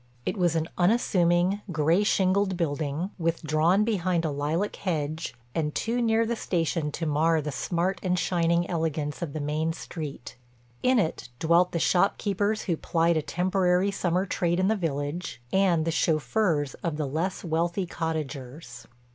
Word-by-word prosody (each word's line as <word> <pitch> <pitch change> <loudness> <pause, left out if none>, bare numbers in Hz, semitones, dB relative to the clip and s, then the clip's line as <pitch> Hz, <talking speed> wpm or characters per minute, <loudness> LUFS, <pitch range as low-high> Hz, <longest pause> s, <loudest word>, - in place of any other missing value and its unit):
It - - -1
was 175 -4 +1
an 160 0 0
unassuming, 180 -1 +2
gray 160 +5 +2
shingled 190 -1 +2
building, 155 +2 -2
withdrawn 165 +3 +2
behind 185 -6 0
a 155 - 0
lilac 155 +8 -1
hedge, 155 -5 -3 0.2
and 150 -2 -1
too 240 +2 0
near 225 0 +3
the 235 +1 -1
station 165 -6 -1
to 165 - -3
mar 160 +2 +2
the 150 0 -3
smart 175 +6 -1
and 180 -1 0
shining 170 -1 +1
elegance 160 -3 -2
of 160 -5 -4
the 155 - -3
main 155 +2 -1
street. 155 -7 -7 0.4
In 255 0 +3
it 165 - -1
dwelt 170 +5 +3
the - - -1
shop 180 +4 +2
keepers 205 +1 0
who 170 -5 -1
plied 165 +1 +1
a 155 - +2
temporary 180 +3 +1
summer 185 -1 0
trade 175 -2 0
in 185 +2 +2
the 220 - +3
village, 150 - -3
and 180 -5 +3
the 165 - +1
chauffeurs 155 - +1
of 165 -3 -2
the 155 - -1
less 165 +7 -2
wealthy 170 +3 0
cottagers. 145 -6 -5
170 Hz, 160 wpm, -27 LUFS, 155-185 Hz, 0.4 s, near